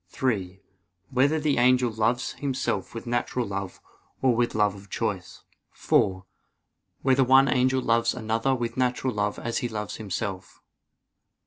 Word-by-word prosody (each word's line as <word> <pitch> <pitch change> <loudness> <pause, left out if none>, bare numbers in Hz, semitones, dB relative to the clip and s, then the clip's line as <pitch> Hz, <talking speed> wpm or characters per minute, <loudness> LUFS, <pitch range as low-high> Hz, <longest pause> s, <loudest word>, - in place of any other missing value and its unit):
(3) 100 -8 -2 0.5
Whether 140 +5 +2
the 150 -4 +1
angel 125 -1 +4
loves 115 +3 0
himself 130 -7 -3
with 115 - -6
natural 120 +1 -1
love 100 -2 -5 0.4
or 130 -3 +3
with 120 -1 0
love 105 -2 +2
of 100 0 -13
choice? 100 -6 -4 0.3
(4) 95 -1 +1 0.8
Whether 135 0 +4
one 135 +2 +6
angel 130 0 +2
loves 115 0 +2
another 115 +4 0
with 120 -1 -4
natural 125 0 0
love 105 0 -1
as 120 0 -2
he 120 - -3
loves 105 -2 -5
himself? 100 -2 -5
120 Hz, 140 wpm, -26 LUFS, 105-130 Hz, 0.8 s, one